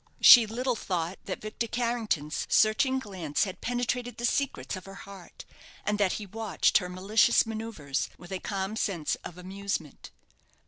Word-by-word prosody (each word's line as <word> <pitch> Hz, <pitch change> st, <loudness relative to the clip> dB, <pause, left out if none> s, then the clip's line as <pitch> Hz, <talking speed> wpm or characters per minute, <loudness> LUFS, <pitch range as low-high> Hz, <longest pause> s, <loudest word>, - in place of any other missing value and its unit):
She 235 Hz, -3 st, +9 dB
little 245 Hz, +3 st, -1 dB
thought 180 Hz, -4 st, -3 dB
that 185 Hz, -, -5 dB
Victor 215 Hz, +2 st, -4 dB
Carrington's 220 Hz, -, -1 dB
searching 260 Hz, +5 st, +3 dB
glance 185 Hz, -, -2 dB
had 190 Hz, -3 st, -5 dB
penetrated 245 Hz, 0 st, -2 dB
the 240 Hz, -, -2 dB
secrets 275 Hz, -3 st, -1 dB
of 185 Hz, -, -9 dB
her 195 Hz, 0 st, -10 dB
heart; 195 Hz, -3 st, -12 dB, 0.4 s
and 210 Hz, 0 st, 0 dB
that 195 Hz, -3 st, +2 dB
he 210 Hz, -, -5 dB
watched 210 Hz, -2 st, +1 dB
her 180 Hz, -2 st, -6 dB
malicious 200 Hz, +7 st, +3 dB
manoeuvres 220 Hz, -11 st, -3 dB
with 175 Hz, +2 st, -13 dB
a 190 Hz, -, -3 dB
calm 195 Hz, +1 st, -3 dB
sense 175 Hz, -8 st, -1 dB
of 175 Hz, -, -9 dB
amusement. 190 Hz, -4 st, -5 dB
205 Hz, 155 wpm, -28 LUFS, 180-230 Hz, 0.4 s, She